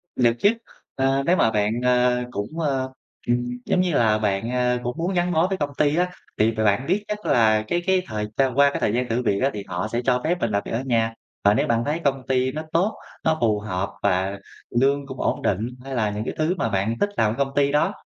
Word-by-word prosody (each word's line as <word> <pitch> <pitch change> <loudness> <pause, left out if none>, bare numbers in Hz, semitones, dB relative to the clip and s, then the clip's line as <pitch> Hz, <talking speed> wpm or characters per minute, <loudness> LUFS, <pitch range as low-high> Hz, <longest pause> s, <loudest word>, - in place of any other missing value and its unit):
Được 120 -2 +3
chứ. 205 - +5 0.5
A, 135 +1 +1
nếu 175 - +4
mà 110 - +3
bạn, 105 0 +1
a, 125 0 +3
cũng, 105 +10 -5
ơ, 135 -4 0 0.4
ừm, 120 - +3 0.3
giống 180 - +2
như 180 -2 0
là, 110 -5 +3
bạn, 105 +1 -1
a, 125 0 +1
cũng 120 0 -3
muốn 175 +4 -1
gắn 175 0 +1
bó 165 +1 +3
với 190 0 -2
công 145 -3 -2
ty 150 0 +2
á, 180 +2 +1 0.3
thì 110 +1 +4
b 110 - -11
bạn 110 +4 +2
biết 195 +5 +1
chắc 210 0 -5
là 110 -2 +3
cái 175 - 0
cái 190 -1 +3
thời 105 -1 -3
gian 135 -2 +1
qua 140 0 +6
cái - - -3
thời 105 - +1
gian 125 +1 -1
thử 115 +2 0
việc 100 -4 +1
á 135 - +3
thì 105 - -5
họ 90 +4 -3
sẽ 120 - 0
cho 125 0 +2
phép 175 +3 +1
mình 115 - -1
làm 100 0 0
việc - - -6
ở 115 - -1
nhà, 115 -3 +1 0.3
và 100 - +5
nếu 105 - +1
bạn 115 0 +1
thấy 150 +3 -1
công 135 -2 0
ty 130 0 +1
nó 155 - -4
tốt, 190 +6 +2 0.3
nó 160 0 +2
phù 110 -3 +2
hợp 100 -2 -3
và 95 +2 +1 0.4
lương 140 +2 +2
cũng 130 -1 -8
ổn - - 0
định, 105 +4 0 0.2
hay 135 0 -5
là 110 -3 +1
những 105 +1 -4
cái - - -3
thứ 160 +4 +1
mà 115 - 0
bạn 100 +2 0
thích 205 - +2
làm 110 -1 +3
ở - - -7
công 135 0 -1
ty 140 -1 +3
đó 150 +7 +2
125 Hz, 260 wpm, -23 LUFS, 110-145 Hz, 0.5 s, qua